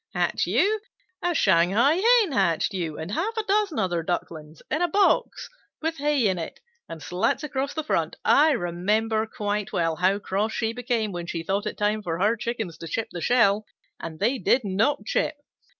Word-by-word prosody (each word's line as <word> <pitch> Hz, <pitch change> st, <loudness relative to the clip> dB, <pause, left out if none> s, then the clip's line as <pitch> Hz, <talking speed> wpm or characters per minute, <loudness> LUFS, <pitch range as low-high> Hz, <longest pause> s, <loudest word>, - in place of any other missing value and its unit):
"Hatch -, -, 0 dB
you? 430 Hz, +3 st, +2 dB, 0.4 s
A 350 Hz, -1 st, 0 dB
Shanghai 200 Hz, -, +3 dB
Hen 450 Hz, -2 st, +4 dB
hatched 195 Hz, -, +1 dB
you 165 Hz, -5 st, -3 dB
and 160 Hz, +4 st, -6 dB
half 420 Hz, -, -2 dB
a 445 Hz, -, 0 dB
dozen 405 Hz, -5 st, +1 dB
other 175 Hz, -3 st, 0 dB
Ducklings 160 Hz, -2 st, -5 dB
in 310 Hz, -, 0 dB
a 350 Hz, -, +3 dB
box 395 Hz, +4 st, +1 dB, 0.3 s
with 320 Hz, +1 st, -2 dB
hay 285 Hz, -5 st, +2 dB
in 185 Hz, -2 st, 0 dB
it 165 Hz, -, -6 dB, 0.3 s
and 160 Hz, -, -8 dB
slats 180 Hz, -, 0 dB
across 280 Hz, -1 st, -3 dB
the 315 Hz, -, -2 dB
front. 310 Hz, -, -1 dB
I 305 Hz, +3 st, +5 dB
remember 215 Hz, +3 st, 0 dB
quite 210 Hz, -1 st, -3 dB
well 165 Hz, -4 st, 0 dB
how 185 Hz, +3 st, +2 dB
cross 205 Hz, +2 st, -2 dB
she 225 Hz, -1 st, -1 dB
became 235 Hz, -3 st, -1 dB
when 175 Hz, -2 st, -5 dB
she 165 Hz, -1 st, -4 dB
thought 200 Hz, +4 st, -1 dB
it -, -, -5 dB
time 210 Hz, +1 st, 0 dB
for 165 Hz, -4 st, -3 dB
her 210 Hz, +6 st, +2 dB
Chickens 220 Hz, -6 st, -4 dB
to 165 Hz, -, -7 dB
chip 220 Hz, +7 st, -3 dB
the 175 Hz, -, -6 dB
shell, 215 Hz, -1 st, +3 dB, 0.4 s
and 160 Hz, -1 st, -7 dB
they 245 Hz, +6 st, +1 dB
did 260 Hz, -, +3 dB
not 205 Hz, +4 st, 0 dB
chip. 305 Hz, -, 0 dB
215 Hz, 190 wpm, -25 LUFS, 180-280 Hz, 0.4 s, I